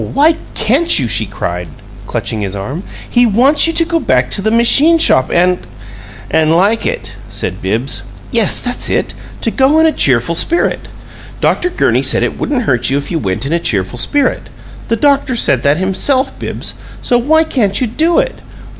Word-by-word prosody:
Why 300 +4 +4 0.2
can't 265 +10 +2
you?" 130 - +1
she 110 -1 +1
cried, 90 -2 -5 0.4
clutching 110 - -3
his 100 -1 -4
arm. 130 - -5 0.3
"He 240 0 +3
wants 260 +9 +3
you 330 - -1
to 330 0 +2
go 335 0 0
back 125 - 0
to 200 - -2
the 220 - 0
machine 275 +8 +4
shop 130 - +3
and 180 +1 +2 0.4
" - - -16 0.3
"And 160 -1 +2
'like 200 +7 +2
it'!" 100 0 -4 0.2
said 100 -3 -5
Bibbs. 110 +3 -2 0.3
"Yes, 230 -4 +3
that's 245 -1 0
it - - -1 0.3
to 225 - -1
go 275 +5 +2
in 320 - +4
a 320 - +4
cheerful 130 - +1
spirit. 335 - -1 0.5
Dr. 360 - 0
Gurney - - +1
said - - 0
it - - -3
wouldn't 260 -4 -1
hurt 125 - +1
you 135 - +1
if 140 - -5
you 165 - -1
went 100 +1 -3
in 145 - -2
a 170 - +1
cheerful 105 - -2
spirit 285 - -1 0.4
the 230 - +1
doctor 280 +1 +1
said 135 - +1
that 145 +1 +2
himself, 255 +9 0
Bibbs. - - -4 0.3
So 245 -2 +2
why 315 +6 +3
can't 210 -10 0
you 255 - +1
do 320 +9 0
it? - - -1
200 Hz, 190 wpm, -13 LUFS, -, 0.5 s, Why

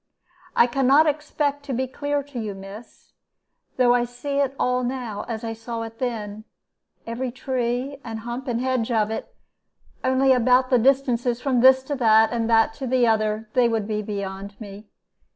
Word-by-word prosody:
"I - - +6
can 255 +2 0
not 290 +4 +6
expect 295 -1 -1
to 275 - -4
be 260 +2 0
clear 285 +2 -2
to 275 -3 -8
you, 210 -3 -4
miss, 195 +4 -12 0.7
though 245 -1 +4
I 245 0 +2
see 245 +4 -4
it 275 -1 0
all 250 0 +1
now 245 -5 -4
as 225 -1 -5
I 225 0 -3
saw 230 +1 -6
it 225 0 -9
then, 215 -4 -4 0.6
every 240 +3 -3
tree, 255 +1 -3
and 225 -1 -6
hump, 240 +3 -6
and 235 -2 -1
hedge 255 -3 0
of 220 -2 +1
it; - - -6 0.7
only 260 +1 +3
about 255 +1 +3
the 250 - +5
distances 245 -2 +2
from 255 -1 +1
this 260 +1 +6
to 285 - -4
that, 220 -2 +4
and 230 -1 -1
that 225 -1 +4
to 265 - -2
the 250 0 +3
other, 215 -1 0
they 245 -2 +3
would 220 -3 -1
be 215 -1 -2
beyond 200 -1 -6
me. 205 -1 -10
245 Hz, 185 wpm, -23 LUFS, 225-260 Hz, 0.7 s, I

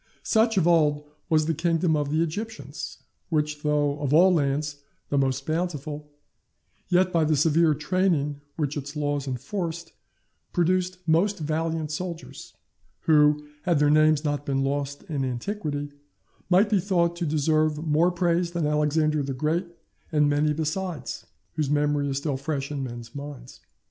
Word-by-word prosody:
Such, 225 -1 +2
of 180 - +3
old, 150 -3 +3 0.3
was 155 -1 +3
the 165 - +1
kingdom 165 0 +1
of 145 -1 -1
the 155 +3 +2
Egyptians, 165 -4 -6 0.3
which, 150 -2 -1
though 150 -1 +1
of 145 0 +1
all 180 +3 +6
lands 145 -1 0 0.3
the 145 - 0
most 135 0 0
bountiful, 155 -3 -3 0.8
yet, 180 0 +3
by 165 -1 +3
the 155 0 +2
severe 155 +1 +3
training 150 -2 0
which 150 -3 -2
its 145 +1 -5
laws 145 -1 -1
enforced, 165 - -4 0.6
produced 185 +1 +1
most 185 +6 +3
valiant 160 0 -2
soldiers, 170 +1 -6 0.5
who, 150 -1 +4 0.2
had 175 -2 +1
their 145 0 +4
names 155 0 +4
not 145 -1 -1
been 135 -1 0
lost 140 +1 -2
in 145 -4 -3
antiquity, 145 - -3 0.6
might 195 +4 +4
be 205 - +4
thought 170 -2 +1
to 170 - -2
deserve 155 0 +2
more 160 +3 +3
praise 175 0 0
than 170 -3 0
Alexander 150 0 +1
the 135 -1 -3
Great 160 +6 0 0.4
and 150 -2 +3
many 145 +1 +2
besides, 155 -1 -3 0.3
whose 150 -3 -1
memory 145 -1 +1
is 135 - -1
still 140 -1 -2
fresh 140 0 -3
in 145 -2 -3
men's 120 -2 -7
minds. 140 -3 -9
155 Hz, 155 wpm, -26 LUFS, 145-170 Hz, 0.8 s, all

